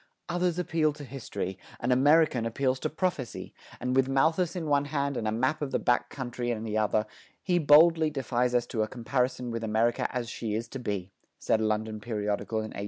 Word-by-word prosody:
"Others 175 0 0
appeal 160 -3 +1
to 150 0 -10
history: 115 -8 -5 0.2
an 120 - 0
American 145 0 +4
appeals 130 +2 0
to - - -2
prophecy; 155 -7 -3 0.3
and 125 +1 -1
with 135 0 +3
Malthus 160 +6 +2
in 175 -3 -3
one 145 -1 +2
hand 140 -1 -1
and 110 - -2
a - - +1
map 130 +8 0
of 145 - -1
the - - 0
back 120 - +1
country 120 -2 -4
in 110 -2 -2
the 110 -1 -3
other, 110 0 +1 0.4
he 180 -2 +2
boldly 160 +1 +6
defies 125 -3 0
us 120 -1 +2
to 115 -2 -2
a 110 - +1
comparison 125 +1 -1
with 115 0 -4
America 110 +2 +1
as 125 -2 -3
she 110 -2 -3
is 115 +2 -3
to 135 - -6
be," 100 -5 -4 0.3
said 110 - +1
a - - +1
London 110 0 -2
periodical 105 0 -2
in 110 0 -3
1821. - - -7
125 Hz, 210 wpm, -28 LUFS, 110-145 Hz, 0.4 s, boldly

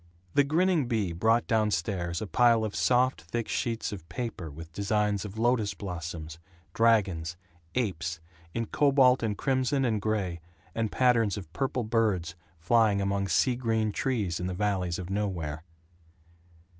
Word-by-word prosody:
The 145 - +5
grinning 160 0 +2
Bea 105 -7 0
brought 110 +7 +2
down 110 -3 +2
stairs 85 -1 -2
a - - -3
pile 115 +1 +4
of 110 -2 -3
soft 130 +1 +2
thick 110 +8 -4
sheets 115 -1 -2
of 90 -5 -8
paper 115 -9 -5
with 80 +3 -11
designs 105 +1 0
of 105 +1 -8
lotos 115 -2 +1
blossoms, 80 -4 -6 0.3
dragons, 95 -7 +2 0.4
apes, 90 -8 -2 0.3
in 115 +6 -2
cobalt 135 0 +4
and 105 -3 -1
crimson 135 0 +1
and 110 -4 0
gray, 100 -6 -1 0.3
and 115 -2 -1
patterns 115 -6 +3
of 90 -5 -9
purple 130 +3 -1
birds 105 -7 0 0.3
flying 105 +3 +3
among 100 0 0
sea 120 +8 +2
green 110 -3 0
trees 105 - -1
in 90 - -2
the 90 - -3
valleys 95 -3 -1
of 90 0 -6
Nowhere. 85 -7 -2
105 Hz, 150 wpm, -28 LUFS, 90-120 Hz, 0.4 s, The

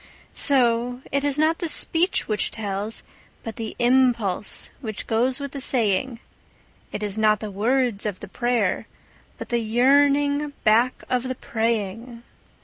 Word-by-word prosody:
So 245 -2 +1
it 280 0 0
is 285 -1 +1
not 315 +2 +2
the 340 - -1
speech 345 +5 +3
which 215 -2 0
tells, 205 0 -4 0.4
but 225 -2 -7
the 225 -2 -5
impulse 240 -6 +1
which 215 -5 -6
goes 245 +4 0
with 280 -1 -5
the 280 - -5
saying; 235 -1 0 0.7
And 210 - -5
it - - 0
is 205 +1 -3
not 215 -1 +3
the 215 -1 -6
words 230 +1 0
of 200 -3 -4
the - - -9
prayer, 240 -2 -1 0.5
but - - -8
the 240 -2 +1
yearning 285 +5 +2
back 230 +3 +2
of 250 0 -1
the 255 - -3
praying. 230 +1 -3
240 Hz, 150 wpm, -23 LUFS, 215-265 Hz, 0.7 s, speech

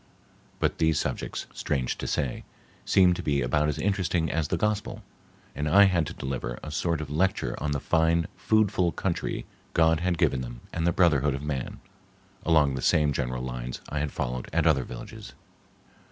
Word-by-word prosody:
but - - 0
these 80 -2 +3
subjects, - - -3
strange 65 -4 -1
to - - -5
say, 70 -5 -2 0.4
seemed 90 -2 +5
to - - -4
be 70 -3 0
about 75 +5 +1
as 75 - -2
interesting 90 -2 0
as 80 -2 0
the - - -1
gospel, 105 -1 -2 0.5
and 75 +1 -2
I 100 +6 +7
had 90 -6 +3
to 85 - -6
delivery 65 -4 -4
sort 85 0 -1
of 75 -2 -6
lecture 80 -6 0
on 75 - -1
the 70 - 0
fine 80 +3 +2
foodful 100 -5 +2
country 90 -3 -2 0.3
God 80 -1 +4
had 90 0 0
given 65 - +2
them - - -7
and 80 - 0
the - - +4
brotherhood 75 -6 +3
of 70 - -6
man, 70 -4 -4 0.6
along 75 -4 +4
the 65 - -3
same 75 +1 +3
general 65 -1 -2
lines 60 -1 -5
I 75 - -2
had 75 0 -2
followed 60 0 -3
at - - +1
other 70 -6 +3
villages. - - -9
75 Hz, 180 wpm, -27 LUFS, 70-85 Hz, 0.6 s, I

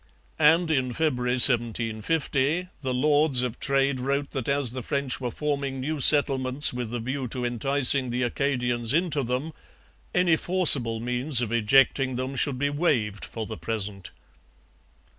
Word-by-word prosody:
And, 160 +2 +2
in 130 -4 -1
February 125 -4 -2
1750, 130 +7 +1
the 130 -2 -4
Lords 145 0 +1
of 125 -1 -5
Trade 140 -1 -1
wrote 140 +2 -3
that 135 -2 -5
as 140 -4 +2
the 130 +1 -7
French 135 0 -3
were 125 - -3
forming 140 0 -4
new 150 +3 -4
settlements 135 -1 +4
with 125 -2 -6
a 120 - -4
view 130 +3 -5
to 125 +1 -3
enticing 130 +2 +3
the 125 +2 -3
Acadians 120 -1 -2
into 165 -4 -1
them, 130 +6 -4 0.6
any 175 -3 +2
forcible 145 -12 +4
means 125 +3 +1
of 120 -3 -3
ejecting 130 +3 +1
them 130 +2 -5
should 135 -1 -1
be 145 +2 -2
waived 125 - -2
for 110 -1 -7
the 110 0 -9
present. 105 -4 -5
130 Hz, 150 wpm, -24 LUFS, 120-145 Hz, 0.6 s, settlements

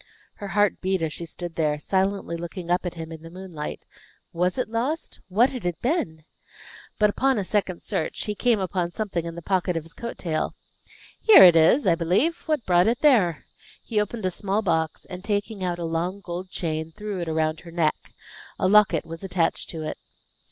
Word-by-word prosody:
Her 205 - -6
heart 205 +1 +1
beat 190 -2 0
as 155 -2 -1
she 170 - -6
stood 175 +1 -7
there, 155 -2 0
silently 190 +2 -1
looking 170 +1 -6
up 180 +1 +1
at 175 - -5
him 165 -1 -7
in 160 -1 -8
the 165 - -10
moonlight. 175 -4 -7 0.5
Was 180 +4 0
it 255 - 0
lost? 245 +9 -3
What 220 +8 +3
had 250 -4 -6
it 175 -2 -2
been? 170 - -1 0.7
But, 210 -1 +4
upon 265 +3 +1
a 205 - 0
second 190 -2 -1
search, 155 - -2
he 210 - -2
came 230 +1 +2
upon 185 -2 -1
something 185 -3 -3
in 165 0 -5
the 170 - -8
pocket 180 -2 0
of 165 - -3
his 165 +1 -14
coat 235 0 -6
tail. 160 -3 -2 0.6
"Here 440 -3 +9
it 175 -2 +9
is, 165 - +5
I 180 - +5
believe; 185 - +2
what 305 -7 0
brought 175 +1 +4
it 235 +1 +1
there?" 190 - +4 0.4
He 215 -2 0
opened 210 0 -4
a 185 - +1
small 200 +4 -1
box, 160 -4 -1
and 180 -1 -8
taking 205 -1 -2
out 175 -1 -1
a 170 - -4
long, 170 +4 -2
gold 180 0 -6
chain, 160 -3 -3
threw 210 0 -5
it 170 - -3
around 155 0 0
her 170 - -12
neck. 165 -3 -1 0.5
A - - +1
locket 200 -5 +4
was 165 +1 -8
attached 180 -3 0
to 160 -2 -5
it. 155 - -5
180 Hz, 205 wpm, -25 LUFS, 165-210 Hz, 0.7 s, Here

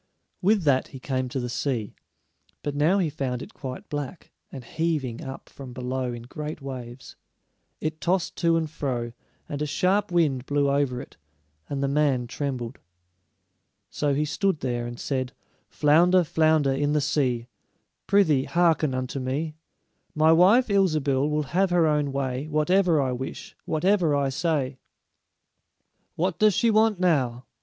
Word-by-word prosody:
With 200 0 +3
that 135 -3 +2
he 135 - -10
came 130 -1 -2
to 130 - -3
the 125 - -3
sea, 120 -4 -2 0.7
but 145 - -2
now 155 +7 +3
he 185 -4 +2
found 130 -4 -3
it - - -12
quite 130 -2 -7
black, 145 +3 -6 0.2
and 130 - -8
heaving 145 -4 -2
up 135 0 -8
from 130 -3 -10
below 125 0 -3
in 120 -1 -7
great 150 +5 -6
waves. 130 -2 -8 0.6
It 155 0 -4
tossed 180 0 0
to 170 -1 +3
and 160 -1 -1
fro, 125 -6 -3 0.3
and 145 0 -5
a 150 - 0
sharp 190 +6 +1
wind 145 -7 +1
blew 145 -1 +2
over 140 -3 0
it, 135 - -11 0.5
and 140 -1 -2
the - - +2
man 140 -3 +1
trembled. 125 -1 -4 1.1
So 145 -2 0
he 150 +2 +1
stood 160 +2 0
there, 120 -2 -2
and 120 0 -8
said: 130 -2 -2 0.4
"Flounder, 175 +5 +4
flounder 155 -3 +2
in 145 +2 0
the 150 - +3
sea, 130 -5 0 0.6
Prythee, 160 -10 +3
hearken 165 -5 +2
unto 130 +1 -3
me: 140 +5 -2 0.6
My 155 +1 +5
wife, 195 +10 +5
Ilsebil, 155 - +2
will 150 0 0
have 190 +2 +3
her 175 -2 +3
own 150 -2 +1
way 135 +1 -2
Whatever 165 +2 +3
I 130 -2 +1
wish, 125 +1 -6
whatever 170 -1 +2
I 140 -1 +1
say." 140 -3 -1 1.4
"What 180 0 -1
does 215 -3 +4
she 230 - +3
want 215 -2 +3
now?" 130 -9 +1
145 Hz, 155 wpm, -25 LUFS, 130-165 Hz, 1.4 s, My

